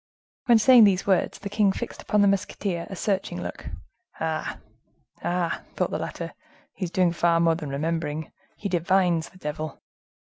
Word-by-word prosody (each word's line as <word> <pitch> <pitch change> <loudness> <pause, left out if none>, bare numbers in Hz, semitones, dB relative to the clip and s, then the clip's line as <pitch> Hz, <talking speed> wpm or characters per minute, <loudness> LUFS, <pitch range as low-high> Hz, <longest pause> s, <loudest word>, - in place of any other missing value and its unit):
When 235 -2 +7
saying 235 0 +8
these 195 -2 +2
words, 190 -3 +1
the 200 - -7
king 205 -1 +2
fixed 240 +4 -6
upon 210 -1 +2
the - - +5
musketeer 195 -3 -1
a 195 - -6
searching 190 - -1
look. 90 0 -6 0.5
"Ah! 160 -1 -2 0.7
ah!" 175 -1 -1
thought - - 0
the - - -2
latter, - - -5 0.4
"he 190 - -3
is - - -5
doing 180 0 +2
far 170 0 +2
more 165 -1 +4
than 160 -3 -5
remembering, 155 +1 -2 0.3
he 205 - -3
divines. 175 -2 +2
The 185 - -18
devil!" 155 -2 -5
175 Hz, 170 wpm, -25 LUFS, 165-200 Hz, 0.7 s, saying